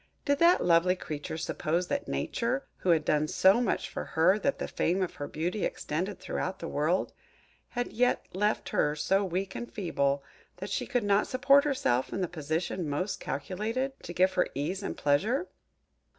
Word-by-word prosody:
Did 285 0 +2
that 340 +1 +5
lovely 175 +1 +4
creature 155 -2 -5
suppose 165 +2 -1
that 285 0 -2
Nature, 255 +3 -1
who 185 - -2
had 160 -3 +4
done 150 0 +2
so 190 +8 +4
much 235 - 0
for - - -5
her 180 +6 +3
that 275 +5 0
the - - -3
fame 185 +3 0
of 180 - -3
her 145 - -4
beauty 175 +7 -2
extended 180 +5 -2
throughout 185 +1 -3
the 165 - -6
world, 160 +6 0 0.6
had 245 0 -3
yet 250 +2 +2
left 210 +3 0
her 150 -7 +1
so 190 +7 +2
weak 190 +1 -2
and 240 - -6
feeble 140 -8 0 0.3
that - - -6
she - - -1
could 245 -4 0
not 205 0 +3
support 275 +2 +4
herself 130 - +1
in 195 - -2
the 180 - 0
position 160 +1 -3
most 185 +8 -2
calculated 215 - -3
to - - -7
give 185 +2 +3
her 180 - +2
ease 165 +8 -2
and 195 - -4
pleasure? 210 - +1
185 Hz, 180 wpm, -29 LUFS, 160-220 Hz, 0.6 s, that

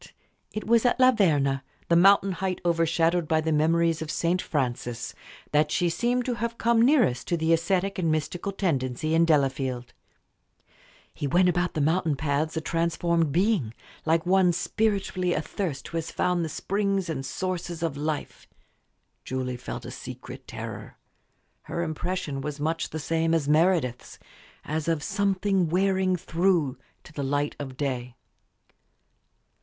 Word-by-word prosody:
But - - -15 0.4
it 215 - -4
was 230 0 +4
at 245 +1 +2
La 255 0 +7
Verna, 145 - +2 0.2
the 170 - +3
mountain 195 +2 +6
height 185 0 -2
overshadowed 165 0 +2
by 160 0 +2
the 160 0 -1
memories 165 +1 +2
of 160 - -5
St. 170 +3 0
Francis, 120 -4 -3 0.4
that 150 0 +3
she 175 +3 +1
seemed 245 +7 0
to 250 - 0
have 235 +1 -3
come 230 -1 +3
nearest 240 - +3
to 170 - +1
the 160 +1 +2
ascetic 190 +3 0
and 165 -3 +1
mystical 155 +5 -2
tendency 155 -5 -1
in 165 +1 +5
Delafield. 135 -5 0 1.2
He 145 - -3
went 180 +5 +4
about 175 0 0
the 155 - 0
mountain 160 0 +2
paths 155 +2 -1
a - - 0
transformed 165 -1 0
being, 175 - +1 0.3
like 160 +1 +1
one 190 +1 +4
long - - +4
spiritually 190 -1 0
athirst 155 -2 -3
who 165 - -3
has 165 - -3
found 180 -1 0
the 160 - -3
springs 195 +2 -1
and 145 -5 -3
sources 175 +3 -4
of 160 -4 -1
life. 150 +1 -4 0.8
Julie 130 -1 -3
felt 125 - -7
a - - -6
secret - - -9
terror. - - -7 0.7
Her 170 - -3
impression 160 -3 -3
was 150 0 -5
much 160 +2 -1
the 160 - -5
same 165 +1 +1
as 155 -4 0
Meredith's 155 -5 +1 0.5
as 155 +1 -2
of 165 -3 0
"something 195 -2 +1
wearing 190 +1 +2
through" 170 -5 +1 0.2
to 160 - -15
the 145 - -4
light 145 +2 -1
of 135 -3 -6
day. 125 -3 -3
165 Hz, 155 wpm, -26 LUFS, 150-185 Hz, 1.2 s, La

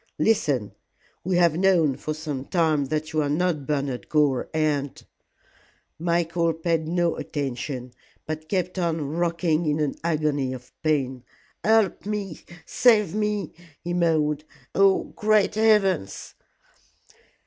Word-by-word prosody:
"Listen. 145 - +1 0.5
We 185 +1 0
have 170 -3 +4
known 175 -7 +3
for 155 +3 -4
some 150 -4 -5
time 155 -5 +1
that 155 +3 -3
you 155 - +2
are 145 - -1
not 155 -2 0
Bernard 140 -4 -2
Gore, 145 -5 +2
and 150 -3 -1 0.5
" - - -35
Michael 170 0 +1
paid 165 -1 -1
no 170 0 0
attention, 130 -2 -4 0.3
but 155 0 -6
kept 185 -1 -1
on 165 -5 -1
rocking 170 -1 0
in 150 +1 +1
an 150 -2 0
agony 150 -5 0
of 125 -1 -10
pain. 135 -5 0 0.4
"Help 220 -3 +2
me 205 -5 -4 0.2
save 215 -7 +3
me!" 210 -1 -1 0.3
he 175 0 -3
moaned. 155 -4 +1 0.3
"Oh, 195 -1 +4
great 215 -1 +3
heavens!" 205 - +1
160 Hz, 125 wpm, -24 LUFS, 145-180 Hz, 0.5 s, have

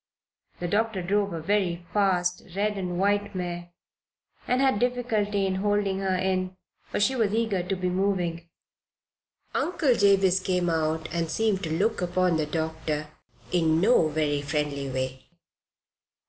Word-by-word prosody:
The 175 - -2
doctor 210 0 0
drove 200 +2 +1
a 165 - -4
very 175 -1 0
fast 180 -3 +2
red 210 +1 0
and 180 -3 -3
white 205 +1 +1
mare 175 -1 -4 0.8
and 250 - +2
had 265 -6 +3
difficulty 220 -5 0
in 190 -1 0
holding 205 -1 +1
her 190 -1 0
in, 185 0 -1 0.3
for - - -2
she 260 +6 +2
was 220 -4 +1
eager 225 -5 +1
to 180 +2 -2
be 185 0 -2
moving. 180 -3 -1 1.0
Uncle 335 -7 +2
Jabez 195 -3 +4
came 180 -2 0
out 160 0 0
and 165 -1 -1
seemed 210 +2 +1
to 160 0 -1
look 220 +3 +1
upon 180 -1 +1
the 155 -1 -1
doctor 160 -1 -3 0.4
in 160 -2 +3
no 200 -3 +4
very 150 -2 0
friendly 145 -1 -2
way. 130 0 -4
185 Hz, 145 wpm, -26 LUFS, 165-205 Hz, 1.0 s, Jabez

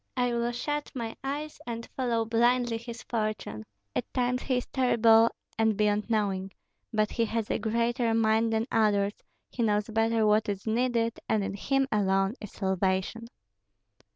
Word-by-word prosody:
I 245 -1 +1
will 235 0 0
shut 295 +4 -3
my 230 -3 -4
eyes 290 +3 -4
and 230 -1 -5
follow 235 -3 0
blindly 240 +1 +2
his 235 +1 -8
fortune. 215 - -3 0.3
At - - -2
times 250 0 +1
he 255 -2 0
is 250 - -2
terrible 230 -3 +4 0.3
and 220 -2 +3
beyond 210 +1 +1
knowing; 195 -3 0 0.4
but 215 -2 +1
he 230 - +1
has 225 -1 -2
a - - 0
greater 235 +1 0
mind 225 0 +3
than 220 0 +1
others, 205 -2 +2 0.4
he 245 - -4
knows 210 -1 +1
better 225 0 +2
what 215 0 +3
is 200 -1 -3
needed, 230 0 0
and 215 -2 +2
in 195 - -3
him 270 +7 0
alone 195 -1 +2
is 210 - -8
salvation." 190 +3 -1
225 Hz, 160 wpm, -28 LUFS, 210-240 Hz, 0.4 s, terrible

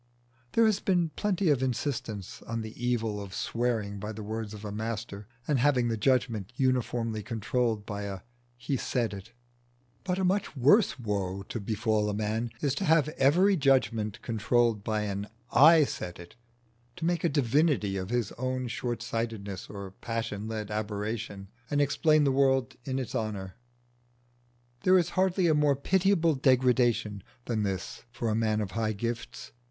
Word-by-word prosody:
There 230 - +5
has 215 -2 +3
been 175 -4 +1
plenty 190 +2 0
of 135 -3 +2
insistance 120 - -3
on 115 0 -2
the 110 0 -7
evil 115 -4 0
of 95 -1 -8
swearing 115 -4 -1
by 105 +2 -4
the 110 0 -7
words 110 0 -4
of 105 0 -9
a 105 - -4
master, 110 -1 -5 0.2
and 145 -4 +2
having 125 -3 +3
the 115 - 0
judgment 115 -3 +1
uniformly 120 -4 0
controlled 115 -1 -1
by 100 -1 -4
a 95 -2 -5 0.4
"He 130 +3 -2
said 120 -3 -1
it;" 100 +3 -9 0.7
but 180 -1 -1
a 190 - 0
much 185 -4 0
worse 150 - +4
woe 100 -5 -2
to 115 - -3
befall 110 0 0
a 105 - -2
man 110 +2 -1
is 140 -3 +1
to - - 0
have 155 -2 +4
every 170 +7 +4
judgment 115 - +1
controlled 115 -1 +1
by 110 -1 -1
an 100 0 -3 0.2
"I 160 +2 +7
said 90 -9 -5
it" 85 0 -12 0.6
to 165 - -4
make 175 0 0
a 170 - +3
divinity 140 -6 +2
of 95 0 -4
his 120 -3 0
own 130 -1 -2
short 120 -1 -3
sightedness 110 -5 -4
or 100 -2 -7
passion 110 0 -4
led 110 -2 -4
aberration 105 -1 -3 0.2
and 145 - +1
explain 150 +2 +3
the 140 - +3
world 135 -2 +2
in 130 -1 -2
its 130 -3 -4
honour. 100 -4 -3 1.3
There 185 +6 +5
is 175 -1 +2
hardly 185 -1 +2
a 160 - +4
more 150 -2 +3
pitiable 175 +2 +2
degradation 125 -6 +2 0.2
than 115 -3 -1
this 95 -2 -3
for 120 -1 -2
a 110 - +1
man 110 -1 +1
of 100 -3 -4
high 110 +1 -1
gifts. 115 +2 -5
115 Hz, 170 wpm, -29 LUFS, 105-140 Hz, 1.3 s, I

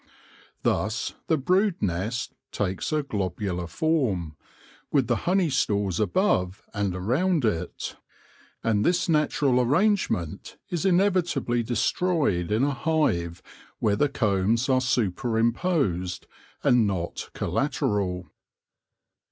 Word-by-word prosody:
Thus 110 +2 0
the 160 - +3
brood 185 +6 +2
nest 100 +6 -2 0.2
takes 95 +4 -2
a 155 -1 +1
globular 95 -6 -3
form, 100 - 0 0.6
with 140 -4 +3
the 120 - +1
honey 180 -4 +2
stores 100 -8 0
above 100 - +1
and 100 -4 -1
around 135 - +1
it; 90 -5 -3 0.7
and 105 -2 +2
this 175 0 +2
natural 145 -5 +2
arrangement 150 - 0
is 175 +2 0
inevitably 175 -10 +2
destroyed 120 - 0
in 110 +4 +2
a 145 - +2
hive 115 - 0 0.3
where 105 -1 +1
the 145 +7 +2
combs 110 0 +1
are 130 -1 +3
superimposed 115 - 0 0.4
and 120 -3 +4
not 90 -4 -3
col - - -3
lateral. 105 - 0
120 Hz, 110 wpm, -26 LUFS, 95-155 Hz, 0.7 s, and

